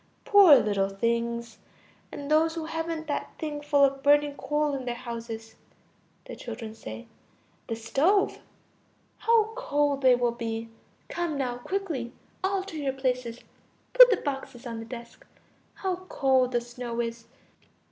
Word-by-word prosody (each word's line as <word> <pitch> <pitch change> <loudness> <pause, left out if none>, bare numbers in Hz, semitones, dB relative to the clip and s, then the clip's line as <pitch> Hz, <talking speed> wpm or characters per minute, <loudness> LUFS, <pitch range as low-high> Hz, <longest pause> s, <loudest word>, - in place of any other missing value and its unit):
Poor 395 -8 +8
little 205 -5 +2
things! 235 +3 -2 0.5
And 285 +1 -6
those 320 +1 +3
who 325 -1 -4
haven't 325 0 -3
that 290 -2 -3
thing 300 -2 -4
full 290 -1 +3
of 275 0 +2
burning 290 +1 +4
coal 295 0 -1
in 265 -2 -4
their 240 -1 -2
houses! 230 -2 -7 0.7
Children. 225 - -7 0.9
The 225 - -2
stove. 295 - +1 0.8
How 450 -1 +3
cold 290 - 0
they 255 -2 +6
will 245 -1 +1
be! 230 -1 -4 0.4
Come 345 -4 -2
now, 250 -3 -2
quickly; 300 -7 -3 0.3
all 385 0 0
to 375 -5 -8
your 275 -2 -1
places. 250 -3 -2 0.5
Put - - +10
the 445 - +3
boxes 270 -4 -5
on 230 -2 -5
the 225 - -7
desk. 235 0 -10 0.5
How 375 -2 -2
cold 260 -2 +2
the 240 - +2
snow 240 0 -6
is! 230 -1 -4
270 Hz, 140 wpm, -27 LUFS, 235-315 Hz, 0.9 s, Put